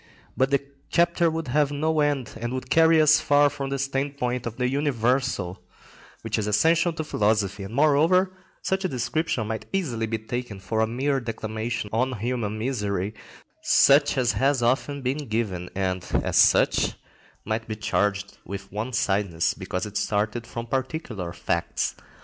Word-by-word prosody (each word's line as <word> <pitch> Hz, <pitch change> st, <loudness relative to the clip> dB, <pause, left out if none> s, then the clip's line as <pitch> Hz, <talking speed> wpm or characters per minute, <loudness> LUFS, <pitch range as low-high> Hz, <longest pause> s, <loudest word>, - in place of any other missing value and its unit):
But 130 Hz, +1 st, +2 dB
the 140 Hz, 0 st, +1 dB, 0.2 s
chapter 170 Hz, 0 st, +3 dB
would 160 Hz, -3 st, -4 dB
have 145 Hz, +2 st, +2 dB
no 155 Hz, +2 st, 0 dB
end, 145 Hz, -5 st, 0 dB
and 120 Hz, +1 st, -3 dB
would 130 Hz, 0 st, -5 dB
carry 165 Hz, 0 st, +6 dB
us 155 Hz, 0 st, +6 dB
far 145 Hz, -1 st, +4 dB
from 140 Hz, -2 st, -4 dB
the 140 Hz, -, -1 dB
standpoint 135 Hz, -2 st, -2 dB
of 115 Hz, -, -5 dB
the 125 Hz, -1 st, +1 dB
universal, 125 Hz, -7 st, 0 dB, 0.6 s
which -, -, -1 dB
is 105 Hz, -, -2 dB
essential 165 Hz, -, +3 dB
to 160 Hz, -, -3 dB
philosophy; 105 Hz, -7 st, 0 dB
and, 100 Hz, +4 st, -7 dB
moreover, 160 Hz, +6 st, +4 dB, 0.3 s
such 190 Hz, 0 st, 0 dB
a -, -, +2 dB
description 130 Hz, -1 st, -1 dB
might 110 Hz, +1 st, -4 dB
easily 125 Hz, -13 st, -1 dB
be 110 Hz, 0 st, -1 dB
taken 110 Hz, -2 st, -5 dB
for 110 Hz, +3 st, -2 dB
a 110 Hz, -, +3 dB
mere 135 Hz, +4 st, 0 dB
declamation 110 Hz, -1 st, -4 dB
on 125 Hz, +2 st, 0 dB
human 110 Hz, -1 st, -2 dB
misery, 105 Hz, -5 st, -2 dB, 0.5 s
such 145 Hz, +1 st, +5 dB
as 125 Hz, -2 st, +3 dB
has 135 Hz, -2 st, +1 dB
often 135 Hz, +3 st, 0 dB
been 135 Hz, +3 st, -2 dB
given, 100 Hz, -6 st, -2 dB
and, 95 Hz, -2 st, -1 dB, 0.2 s
as -, -, -2 dB
such, -, -, +4 dB, 0.5 s
might 110 Hz, +1 st, -2 dB
be 110 Hz, -, -3 dB
charged 105 Hz, -1 st, -1 dB
with 100 Hz, 0 st, -7 dB
one 110 Hz, +5 st, -4 dB
sidedness, 95 Hz, -6 st, +1 dB
because 90 Hz, -, -4 dB
it 105 Hz, -1 st, -5 dB
started 110 Hz, +3 st, -1 dB
from 115 Hz, 0 st, -5 dB
particular 125 Hz, -, -3 dB
facts. 85 Hz, -1 st, -2 dB
125 Hz, 160 wpm, -25 LUFS, 105-145 Hz, 0.6 s, carry